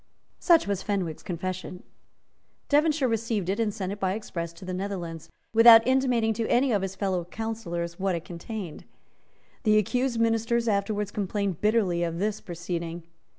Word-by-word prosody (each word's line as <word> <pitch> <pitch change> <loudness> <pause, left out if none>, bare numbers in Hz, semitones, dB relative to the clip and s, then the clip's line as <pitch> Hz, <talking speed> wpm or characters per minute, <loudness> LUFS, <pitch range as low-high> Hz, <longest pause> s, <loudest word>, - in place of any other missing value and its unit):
Such 340 -3 +5
was 200 -2 -1
Fenwick's 185 -7 -2
confession. 185 0 -5 0.9
Devonshire 295 -1 +3
received 225 -5 -1
it 200 +3 -1
and 220 -2 +1
sent 195 -3 -4
it 205 - -6
by 190 -1 0
express 170 -6 -5
to 175 +3 -12
the 185 - -4
Netherlands, 180 -4 -5 0.2
without 230 0 +9
intimating 250 -4 +2
to 225 +1 -2
any 255 +2 +3
of 205 -3 +2
his 195 0 -4
fellow 190 -3 -1
councillors 175 -4 -4
what 190 -1 0
it 170 - -5
contained. 175 0 -7 0.8
The 215 -2 +4
accused 245 +3 0
ministers 230 +1 +1
afterwards 205 0 0
complained 200 -3 -2
bitterly 210 -5 +2
of 170 -1 -1
this 210 +3 -1
proceeding. 170 -2 -5
200 Hz, 155 wpm, -27 LUFS, 180-225 Hz, 0.9 s, without